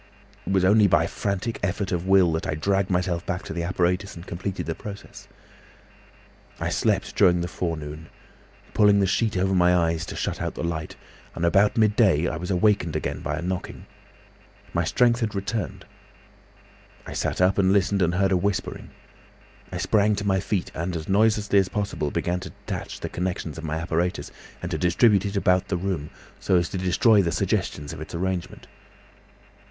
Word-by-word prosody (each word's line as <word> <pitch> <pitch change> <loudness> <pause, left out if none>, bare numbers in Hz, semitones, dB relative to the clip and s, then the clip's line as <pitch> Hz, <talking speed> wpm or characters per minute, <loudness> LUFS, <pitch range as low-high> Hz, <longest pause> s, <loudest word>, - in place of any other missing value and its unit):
"It - - -1
was 95 -1 +3
only 105 +2 +5
by 80 -3 +4
a - - -1
frantic 100 +5 -3
effort 100 0 -2
of 90 0 -2
will 95 -3 +5
that 80 0 -2
I - - -1
dragged 95 +4 0
myself 90 -2 0
back 90 +2 -2
to 100 - -6
the 85 - -3
apparatus 90 +3 -1
and 85 +1 -10
completed 95 +2 -4
the 80 - -2
process. 100 +3 -10 1.3
"I - - -1
slept - - 0
during 90 -3 +4
the 85 - -2
forenoon, 80 -3 -5 0.6
pulling 105 -1 +5
the 100 - +3
sheet 105 +1 0
over 95 +1 +1
my 90 -1 +4
eyes 85 -2 +1
to - - -6
shut - - -3
out - - -3
the - - -4
light, 80 -2 -3 0.4
and 85 - -1
about 100 +6 +3
midday 105 -7 +3
I - - -3
was 90 +1 -5
awakened 95 -3 +2
again - - -2
by 75 +2 -3
a 85 - -4
knocking. 90 0 -4 0.9
My - - +1
strength 120 -1 +3
had 110 -3 -2
returned. 100 +3 -3 1.2
I - - -7
sat - - -2
up 90 +2 +3
and 95 -1 +4
listened 100 0 +2
and 85 0 +2
heard 95 +1 +2
a 95 - +4
whispering. 100 +2 -2 0.8
I - - -4
sprang 105 0 +2
to 100 0 -4
my 95 -1 +2
feet 95 -1 -2
and 85 +2 -3
as 80 -1 -5
noiselessly 105 0 +3
as 95 -1 +1
possible 100 -7 -2
began 90 +4 -1
to - - -8
detach - - -7
the - - -4
connections 85 -3 -3
of - - -9
my 80 -1 -2
apparatus, 85 +2 -2 0.3
and 90 - -4
to 80 - -2
distribute 100 +4 +3
it 100 - -5
about 90 -1 +2
the 90 - -1
room, 85 -5 -3 0.3
so 95 - +1
as 85 -2 +2
to 95 - -4
destroy 100 +4 +4
the 85 -3 0
suggestions 75 -1 -2
of - - -8
its 80 - -7
arrangement. 90 0 -3
90 Hz, 190 wpm, -25 LUFS, 85-100 Hz, 1.3 s, only